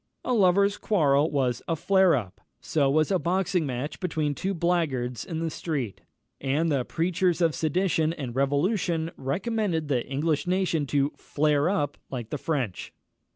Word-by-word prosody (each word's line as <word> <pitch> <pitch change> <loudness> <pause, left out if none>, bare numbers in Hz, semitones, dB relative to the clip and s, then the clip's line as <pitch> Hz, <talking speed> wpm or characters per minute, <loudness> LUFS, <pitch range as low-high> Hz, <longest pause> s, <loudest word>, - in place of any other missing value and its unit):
A 250 - +1
lovers' 200 -1 +3
quarrel 150 -6 +3
was 130 -5 0
a 165 - 0
flare 190 +2 +4
up; 105 -9 -5 0.2
so 140 -3 +1
was 155 +5 +2
a 190 - +2
boxing 180 -2 0
match 130 +3 -4
between 155 -5 -1
two 190 +7 -2
blackguards 155 -9 0
in 165 -2 -4
the 165 -1 -2
streets; 140 - -4 0.4
and 150 +5 0
the 135 -3 +1
preachers 175 +4 0
of 165 -3 +3
sedition 160 +2 +1
and 135 -7 -6
revolution 160 +4 0
recommended 170 - -1
the 125 -4 +1
English 145 +4 -1
nation 180 -5 +1
to 140 +1 +1
flare 150 +1 +1
up, 145 -8 -1
like 120 -4 -6
the 150 - -3
French. 130 - -2
155 Hz, 155 wpm, -26 LUFS, 140-180 Hz, 0.4 s, flare